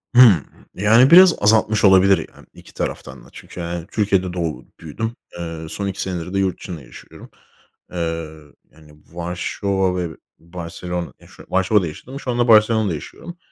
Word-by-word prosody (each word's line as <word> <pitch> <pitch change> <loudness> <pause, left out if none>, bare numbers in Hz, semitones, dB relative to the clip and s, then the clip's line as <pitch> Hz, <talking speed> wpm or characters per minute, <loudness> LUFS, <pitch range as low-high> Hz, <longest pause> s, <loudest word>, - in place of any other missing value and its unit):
Hımm. 110 - +7 0.3
Yani, 115 - +4
biraz 180 0 +9
azaltmış 110 0 +3
olabilir, 95 0 +6 0.2
yani, - - -17
iki - - -16
taraftan - - -6
da - - -17
çünkü, 90 - -10
hani, 85 0 -5
Türkiye'de 95 -4 0
doğup 85 -3 -5
büyüdüm. 115 +9 -5 0.2
Eee, 80 -1 -6
son 100 +4 -4
2 95 - -4
senedir 90 -1 -5
de 100 - 0
yurt 95 -2 -1
dışında 85 -5 -8
yaşıyorum. 65 - -14 0.6
Eee, 80 -2 -4 0.3
yani, 75 -1 -19 0.2
Varşova 90 +2 -2
ve 85 -3 -4 0.2
Barcelona, 85 +1 -6
ya, - - -18
şu - - -16
Varşova'da 95 0 +2
yaşadım, 130 - -9
şu 125 - -4
anda 120 0 0
Barcelona'da 110 -3 +4
yaşıyorum. 170 - -9
95 Hz, 155 wpm, -20 LUFS, 85-105 Hz, 0.6 s, biraz